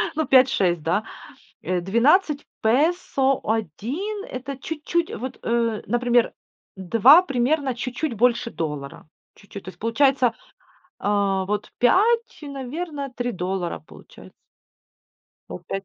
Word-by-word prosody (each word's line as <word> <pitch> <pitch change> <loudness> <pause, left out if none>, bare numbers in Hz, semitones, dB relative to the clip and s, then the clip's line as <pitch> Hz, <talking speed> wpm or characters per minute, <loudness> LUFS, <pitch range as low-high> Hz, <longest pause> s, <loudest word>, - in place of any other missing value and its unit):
Ну, 315 - 0
5-6, 250 -11 +4
да. 180 +6 0 0.6
Э, 180 -1 -1
12 285 - +2 0.2
песо, 275 +1 +2
1- 240 - -3
это 265 +1 -5
чуть-чуть, 320 +4 -2
вот, 255 +2 -6
э, 230 -2 0
например, 240 0 +2 0.4
2- 230 - +6
примерно 275 -1 0
чуть-чуть 250 +3 -3
больше 235 +1 +1
доллара, 150 -3 -5 0.3
чуть-чуть, 200 -2 -11
то 185 - -8
есть - - -15
получается, 250 +1 +2 0.7
а, 200 -2 0
вот 210 +1 -3
5, 455 - +3
наверное, 280 +1 -5
3 245 -1 -3
доллара 180 - -3
получается. 75 - -16 1.2
Ну, 90 - -6
5. 195 0 -4
245 Hz, 115 wpm, -23 LUFS, 200-280 Hz, 1.2 s, 2